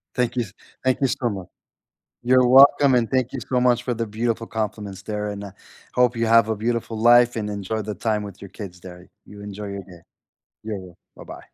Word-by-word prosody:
Thank 125 Hz, -1 st, 0 dB
you 120 Hz, -, +1 dB
s 100 Hz, -3 st, -13 dB, 0.3 s
thank 130 Hz, -1 st, +1 dB
you 135 Hz, -, +4 dB
so 120 Hz, -1 st, -1 dB
much. 95 Hz, -4 st, -6 dB, 0.8 s
You're 125 Hz, 0 st, +4 dB
welcome 135 Hz, +1 st, +7 dB
and 120 Hz, -2 st, +1 dB
thank 130 Hz, -1 st, 0 dB
you 135 Hz, -, -4 dB
so 125 Hz, -1 st, +1 dB
much 125 Hz, -1 st, +3 dB
for 125 Hz, -1 st, -2 dB
the 115 Hz, 0 st, -3 dB
beautiful 115 Hz, +2 st, -2 dB
compliments 105 Hz, -3 st, -4 dB
there, 105 Hz, 0 st, -4 dB
and, 100 Hz, 0 st, -6 dB
uh, 100 Hz, -, -9 dB, 0.4 s
hope 125 Hz, -1 st, +3 dB
you 115 Hz, 0 st, 0 dB
have 115 Hz, -1 st, +5 dB
a 110 Hz, -, -1 dB
beautiful 115 Hz, 0 st, -2 dB
life 120 Hz, +1 st, +5 dB
and 105 Hz, -2 st, -2 dB
enjoy 105 Hz, +2 st, -3 dB
the 105 Hz, 0 st, -5 dB
time 105 Hz, -1 st, -1 dB
with 100 Hz, -2 st, -9 dB
your 100 Hz, -, -9 dB
kids 90 Hz, -4 st, -9 dB
there. 90 Hz, 0 st, -12 dB, 0.2 s
You 105 Hz, 0 st, -12 dB
enjoy 105 Hz, 0 st, -7 dB
your 100 Hz, 0 st, -6 dB
day. 90 Hz, -2 st, -15 dB, 0.6 s
Yeah, 110 Hz, -2 st, -4 dB
yeah. 90 Hz, -1 st, -13 dB, 0.2 s
Bye-bye. -, -, -10 dB
110 Hz, 220 wpm, -23 LUFS, 100-120 Hz, 0.8 s, welcome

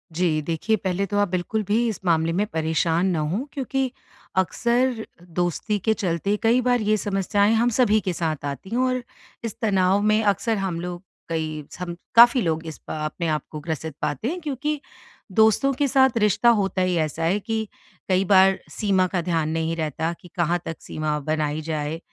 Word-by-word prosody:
जी 165 Hz, -3 st, +1 dB
देखिए 165 Hz, +8 st, 0 dB
पहले 190 Hz, -1 st, -1 dB
तो 205 Hz, +1 st, -2 dB
आप 205 Hz, -, +3 dB
बिल्कुल 185 Hz, +4 st, -1 dB
भी 230 Hz, +3 st, +2 dB
इस 215 Hz, -, -3 dB
मामले 165 Hz, -1 st, +2 dB
में 200 Hz, +4 st, +1 dB
परेशान 160 Hz, +2 st, +1 dB
ना 165 Hz, -, 0 dB
हों 215 Hz, +8 st, -1 dB
क्योंकि 270 Hz, -2 st, -1 dB, 0.5 s
अक्सर 235 Hz, +5 st, +1 dB, 0.3 s
दोस्ती 175 Hz, +4 st, 0 dB
के 220 Hz, -, +5 dB
चलते 195 Hz, -1 st, -1 dB
कई 235 Hz, +3 st, +4 dB
बार 245 Hz, -1 st, +2 dB
ये 215 Hz, +1 st, +2 dB
समस्याएँ 205 Hz, +1 st, +1 dB
हम 235 Hz, +2 st, +3 dB
सभी 215 Hz, -3 st, +4 dB
के 185 Hz, -1 st, -2 dB
साथ 155 Hz, -4 st, -2 dB
आती 140 Hz, +6 st, -5 dB
हैं 230 Hz, -, -2 dB
और 255 Hz, -1 st, 0 dB, 0.4 s
इस 225 Hz, -3 st, -5 dB
तनाव 195 Hz, -2 st, +3 dB
में 215 Hz, +1 st, +3 dB
अक्सर 210 Hz, +2 st, +1 dB
हम 190 Hz, -4 st, -2 dB
लोग 175 Hz, +1 st, -6 dB, 0.3 s
कई 155 Hz, -2 st, -3 dB
हम 175 Hz, -1 st, -4 dB, 0.2 s
काफ़ी 240 Hz, +2 st, +8 dB
लोग 165 Hz, -3 st, -1 dB
इस 160 Hz, -, -7 dB
अ, -, -, -3 dB
अपने 165 Hz, +2 st, -3 dB
आपको 155 Hz, 0 st, -3 dB
ग्रसित 160 Hz, -1 st, -5 dB
पाते 145 Hz, -, -2 dB
हैं 345 Hz, +7 st, -2 dB
क्योंकि 295 Hz, 0 st, -2 dB, 0.5 s
दोस्तों 220 Hz, +7 st, +4 dB
के 285 Hz, -, +3 dB
साथ 265 Hz, -2 st, +3 dB
रिश्ता 210 Hz, +2 st, +4 dB
होता 195 Hz, -2 st, 0 dB
ही 185 Hz, -1 st, +1 dB
ऐसा 160 Hz, 0 st, -1 dB
है 185 Hz, +5 st, +2 dB
कि 220 Hz, +1 st, -3 dB, 0.4 s
कई 185 Hz, +1 st, +3 dB
बार 190 Hz, 0 st, +5 dB
सीमा 195 Hz, -4 st, +1 dB
का 180 Hz, -1 st, -1 dB
ध्यान 165 Hz, -2 st, 0 dB
नहीं 160 Hz, +1 st, -1 dB
रहता 160 Hz, 0 st, -2 dB
कि -, -, -13 dB
कहाँ 175 Hz, 0 st, +1 dB
तक 165 Hz, -, -4 dB
सीमा 155 Hz, -1 st, -2 dB
बनाई 155 Hz, 0 st, -1 dB
जाए। 155 Hz, 0 st, -3 dB
185 Hz, 185 wpm, -24 LUFS, 165-220 Hz, 0.5 s, काफ़ी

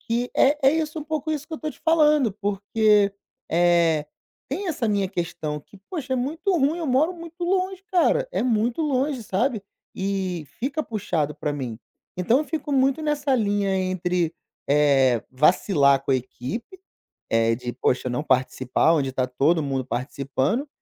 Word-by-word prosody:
que 240 Hz, +1 st, -1 dB
é 285 Hz, +2 st, +5 dB
é -, -, +4 dB
isso, 315 Hz, -1 st, -2 dB
um 300 Hz, -, -6 dB
pouco 310 Hz, 0 st, -3 dB
isso 300 Hz, -1 st, -4 dB
que 320 Hz, -, -5 dB
eu -, -, -7 dB
tô 310 Hz, -, -3 dB
te -, -, -16 dB
falando, 300 Hz, -7 st, +4 dB
porque, 205 Hz, 0 st, +2 dB, 0.4 s
eh, 170 Hz, -3 st, +3 dB, 0.4 s
tem 370 Hz, +8 st, -3 dB
essa 250 Hz, -8 st, -1 dB
minha 200 Hz, -2 st, +1 dB
questão 165 Hz, -5 st, -4 dB
que 195 Hz, +7 st, -18 dB
puxa, 275 Hz, -7 st, -3 dB
é -, -, 0 dB
muito 310 Hz, +10 st, -2 dB
ruim, 295 Hz, +5 st, +1 dB
eu 330 Hz, -, -3 dB
moro 295 Hz, +8 st, +2 dB
muito 335 Hz, +1 st, -7 dB
longe, 375 Hz, +1 st, -1 dB
cara! 430 Hz, +7 st, +3 dB
É -, -, 0 dB
muito 235 Hz, +4 st, +1 dB
longe, 275 Hz, -3 st, 0 dB
sabe? 215 Hz, +2 st, -1 dB, 0.3 s
E 190 Hz, -4 st, -2 dB, 0.2 s
fica 280 Hz, +5 st, -1 dB
puxado 170 Hz, -, -2 dB
pra 150 Hz, -1 st, -3 dB
mim. 125 Hz, -6 st, -5 dB, 0.4 s
Então, 185 Hz, +8 st, +3 dB
eu 305 Hz, -, -1 dB
fico 300 Hz, -1 st, -4 dB
muito 270 Hz, +2 st, +2 dB
nessa 290 Hz, -2 st, 0 dB
linha 205 Hz, -3 st, +1 dB
entre, 180 Hz, -2 st, -1 dB, 0.3 s
eh, 135 Hz, -5 st, +4 dB
vacilar 140 Hz, -1 st, +3 dB
com 135 Hz, -, -3 dB
a -, -, +4 dB
equipe, 175 Hz, -, -6 dB, 0.5 s
eh, 115 Hz, 0 st, +2 dB
de, 120 Hz, 0 st, -5 dB
puxa, 125 Hz, 0 st, 0 dB
não 125 Hz, +4 st, -1 dB
participar, 130 Hz, +3 st, +2 dB
onde 135 Hz, -4 st, 0 dB
tá 130 Hz, -1 st, +1 dB
todo 150 Hz, +6 st, +2 dB
mundo 135 Hz, -2 st, -2 dB
participando 140 Hz, -, -2 dB
205 Hz, 170 wpm, -24 LUFS, -, 0.5 s, é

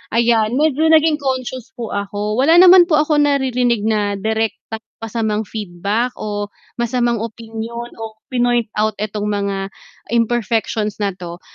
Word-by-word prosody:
Ayan, 230 Hz, -1 st, +3 dB
medyo 305 Hz, +2 st, +2 dB
naging 315 Hz, -1 st, +4 dB
conscious 260 Hz, -3 st, -4 dB
po 235 Hz, -2 st, -5 dB
ako 205 Hz, +1 st, -3 dB
wala 290 Hz, +6 st, +4 dB
naman 365 Hz, -1 st, +8 dB
po 335 Hz, -, +2 dB
ako 305 Hz, 0 st, +1 dB
naririnig 255 Hz, -5 st, +2 dB
na 210 Hz, -2 st, +1 dB
direktang 220 Hz, +2 st, -2 dB, 0.2 s
masamang 220 Hz, -1 st, -1 dB
feedback 210 Hz, +4 st, -2 dB
o 205 Hz, -1 st, -3 dB, 0.3 s
masamang 240 Hz, 0 st, 0 dB
opinyon 230 Hz, +1 st, -6 dB
o 225 Hz, -, -6 dB, 0.3 s
pinoint-out 240 Hz, -4 st, 0 dB
itong 210 Hz, 0 st, -3 dB
mga 200 Hz, -1 st, -1 dB, 0.6 s
imperfections 225 Hz, -2 st, 0 dB
na 200 Hz, -, +1 dB
'to, 175 Hz, -1 st, -9 dB
230 Hz, 130 wpm, -18 LUFS, 210-250 Hz, 0.6 s, naman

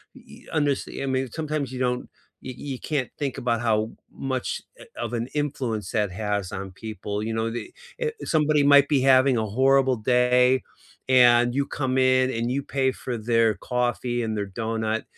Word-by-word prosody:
y -, -, -15 dB
underst 145 Hz, -3 st, +1 dB, 0.2 s
I -, -, -1 dB
mean, 130 Hz, -1 st, -1 dB
sometimes 150 Hz, -4 st, -3 dB
you 130 Hz, -, -6 dB
don't 125 Hz, -1 st, -1 dB, 0.3 s
y 130 Hz, -, -6 dB, 0.2 s
you 130 Hz, -, -5 dB
can't 140 Hz, -5 st, -2 dB
think 140 Hz, -3 st, -2 dB
about 120 Hz, -1 st, 0 dB
how 110 Hz, -1 st, +1 dB, 0.2 s
much, 130 Hz, -2 st, -3 dB, 0.2 s
eh, -, -, -12 dB
of 120 Hz, -1 st, -3 dB
an 120 Hz, +1 st, -2 dB
influence 130 Hz, -7 st, -2 dB
that 105 Hz, -5 st, 0 dB
has 105 Hz, -2 st, -2 dB
on 95 Hz, 0 st, -6 dB
people. 105 Hz, 0 st, -5 dB
You 110 Hz, 0 st, -3 dB
know, 110 Hz, 0 st, -1 dB
the 120 Hz, -, -6 dB, 0.3 s
eh, 465 Hz, -2 st, -1 dB, 0.2 s
somebody 150 Hz, -1 st, +3 dB
might 145 Hz, 0 st, +6 dB
be 140 Hz, -4 st, +2 dB
having 130 Hz, -1 st, +5 dB
a 110 Hz, -, 0 dB
horrible 130 Hz, +3 st, +3 dB
day, 125 Hz, +2 st, +3 dB, 0.5 s
and 120 Hz, -1 st, +5 dB
you 140 Hz, 0 st, +1 dB
come 130 Hz, -3 st, -2 dB
in, 130 Hz, 0 st, +3 dB
and 115 Hz, +1 st, -2 dB
you 140 Hz, +1 st, -1 dB
pay 135 Hz, -2 st, 0 dB
for 125 Hz, -2 st, -5 dB
their 115 Hz, -1 st, +2 dB
coffee 120 Hz, +1 st, -1 dB
and 110 Hz, -1 st, -2 dB
their 100 Hz, -1 st, -2 dB
donut, 110 Hz, +1 st, -2 dB
125 Hz, 180 wpm, -25 LUFS, 110-135 Hz, 0.5 s, might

